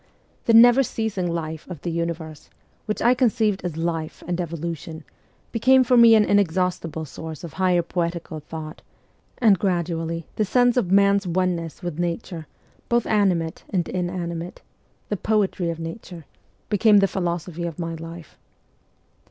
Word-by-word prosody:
The 230 - +3
never 245 +3 +8
ceasing 215 -8 -2
life 160 -1 -5
of 170 -5 -8
the 175 - -2
universe, 165 -2 -4 0.4
which 215 - -2
I 240 - +5
conceived 220 -6 +1
as 175 -3 -4
life 165 -1 -3
and 175 0 -1
evolution, 165 -1 -5 0.5
became 260 +3 +4
for 250 0 +2
me 235 -1 +8
an 215 -1 +5
inexhaustible 180 -5 0
source 160 +2 -8
of 165 -4 -8
higher 180 -2 +2
poetical 170 -2 -3
thought, 155 +1 -8 0.6
and 215 -6 +4
gradually 165 -3 -1
the 215 - +2
sense 245 +4 +3
of 215 -8 0
man's 200 0 +4
oneness 175 -2 -2
with 175 -2 -4
Nature, 170 -1 -3 0.4
both 240 -1 +2
animate 180 -6 +1
and 180 -4 -1
inanimate 175 -1 -4 0.5
the 205 - -1
poetry 195 -4 0
of 165 - -3
Nature 165 -1 -8 0.4
became 210 0 +4
the 195 0 +5
philosophy 175 -2 -3
of 165 - -7
my 165 -1 -4
life. 165 0 -10
175 Hz, 145 wpm, -23 LUFS, 165-205 Hz, 0.6 s, never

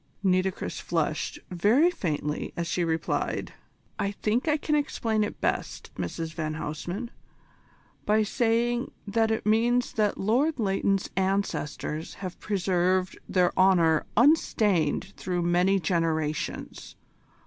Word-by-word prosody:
Nitocris 185 0 0
flushed 160 -2 -1
very 225 - +4
faintly 150 - -3
as 170 - -1
she 175 +2 -1
replied: 160 -1 -1 0.5
"I 200 - 0
think 215 +6 -1
I 305 0 +3
can 300 +1 -2
explain 230 -7 +1
it 210 - -4
best, - - -2
Mrs 160 - -4
van 155 -2 -3
Huysman, 175 +10 -5 1.0
by 215 +1 +4
saying 235 +2 +1 0.2
that 220 +2 +1
it 220 -1 -1
means 235 +3 +2
that 210 -2 +1
Lord 260 +10 +1
Leighton's 195 -2 0
ancestors 190 -5 -2
have 185 -2 -7
preserved 185 -2 +1
their 180 -2 +2
honour 175 -4 +4
unstained 205 - +3
through 180 -2 -2
many 180 +3 +3
generations. 160 -3 -2
190 Hz, 115 wpm, -27 LUFS, 170-220 Hz, 1.0 s, very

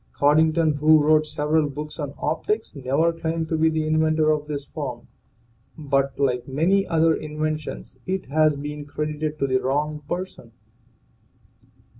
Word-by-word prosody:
Coddington, 155 +2 +3
who 155 +1 +6
wrote 155 0 +4
several 150 0 +1
books 150 +3 -7
on 145 -1 -4
optics, 210 +5 -2
never 140 +5 +1
claimed 165 0 -2
to 160 - 0
be 160 0 +3
the 160 -1 -1
inventor 155 0 +2
of 150 -1 -1
this 145 -2 -4
form, 135 -5 -6 0.7
but 140 -3 0
like 125 -3 0
many 175 +9 +2
other 165 0 +3
inventions 155 0 -4
it 190 0 -2
has 155 +2 +2
been 145 +1 -6
credited 150 +1 -3
to 140 - 0
the 130 -1 +1
wrong 150 +3 -1
person. 185 +2 -5
155 Hz, 145 wpm, -23 LUFS, 145-160 Hz, 0.7 s, who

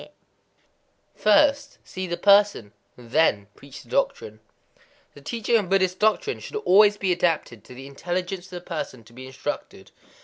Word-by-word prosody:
_ - - -14 1.0
[First] 280 +6 +2
see 185 0 -6
the 175 0 -3
person, 200 - +3 0.2
[then] 120 -3 0
preach 140 -1 -13
the - - -22
doctrine. 110 +1 -2 0.7
The 145 - -15
teaching 230 +8 0
of 200 -5 -3
Buddhist 185 -1 +1
doctrine 220 - +1
should - - -10
always 210 - +4
be 190 -2 -1
adapted 165 - -1
to 125 - -13
the 135 +2 -10
intelligence 175 +6 -4
of 180 - -8
the - - -9
person 155 -9 -6
to 115 +1 -20
be 130 +2 -10
instructed. 135 +2 -7
180 Hz, 160 wpm, -24 LUFS, 135-205 Hz, 1.0 s, always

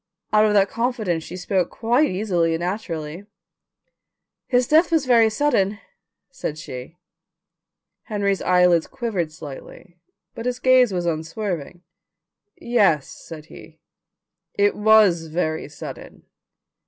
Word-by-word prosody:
Out 215 0 +5
of 210 - +2
that 200 -1 +4
confidence 220 -8 -2
she 180 - -8
spoke 185 -1 -1
quite 240 +6 +1
easily 180 -4 0
and 165 - -5
naturally. 175 -2 -5 1.2
"His 245 -2 +2
death 320 +3 +4
was 320 -4 +2
very 230 -3 +5
sudden," 215 -5 +1 0.5
said 155 - -5
she. 130 +2 -9 1.1
Henry's 200 -3 -1
eyelids 180 -2 +3
quivered 190 -9 -3
slightly 155 +4 -11 0.3
but 230 +2 -5
his 250 0 -1
gaze 255 -2 +4
was 175 -2 -2
unswerving. 170 +1 -4 0.7
"Yes," 210 - +2
said 155 -2 -11
he; 160 0 -14 0.8
"it 205 0 +2
was 210 -6 +4
very 160 -1 -2
sudden. - - -10
195 Hz, 115 wpm, -22 LUFS, 165-225 Hz, 1.2 s, Out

